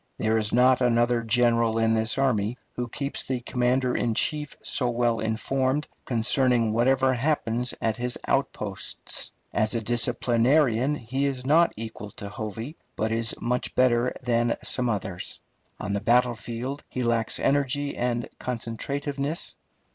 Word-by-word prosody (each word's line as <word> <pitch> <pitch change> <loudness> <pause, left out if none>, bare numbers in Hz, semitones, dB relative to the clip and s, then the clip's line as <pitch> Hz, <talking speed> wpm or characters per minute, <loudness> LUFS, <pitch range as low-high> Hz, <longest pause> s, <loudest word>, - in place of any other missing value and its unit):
There 110 0 +1
is 105 -1 0
not 125 +2 +4
another 120 0 +3
general 115 -1 +2
in 115 0 +3
this 110 +2 +1
army 125 -4 +1 0.2
who 125 0 -2
keeps 140 +4 -2
the 130 -1 -2
commander 125 +1 +1
in 115 -2 0
chief 150 +3 0
so 125 -3 +1
well 120 -1 +1
informed 130 +6 0 0.2
concerning 120 -1 +2
whatever 130 +3 +3
happens 125 -3 0
at 110 -1 0
his 125 0 -2
outposts. - - -2 0.2
As 110 +2 +1
a 115 - 0
disciplinarian 120 +3 +2
he 135 +2 -1
is 130 -2 -3
not 165 +5 +5
equal 110 -2 -6
to 100 - -7
Hovey, 115 - -6 0.2
but 110 +1 -1
is 115 0 +1
much 125 +1 -1
better 125 -1 +3
than 120 -1 +1
some 125 -1 +1
others. 95 -4 -4 0.4
On 100 - -3
the 100 - -1
battlefield 120 +3 0
he 130 - -3
lacks 115 -1 0
energy 145 0 +1
and 120 -1 -1
concentrativeness. 140 +5 -3
120 Hz, 140 wpm, -26 LUFS, 115-130 Hz, 0.4 s, not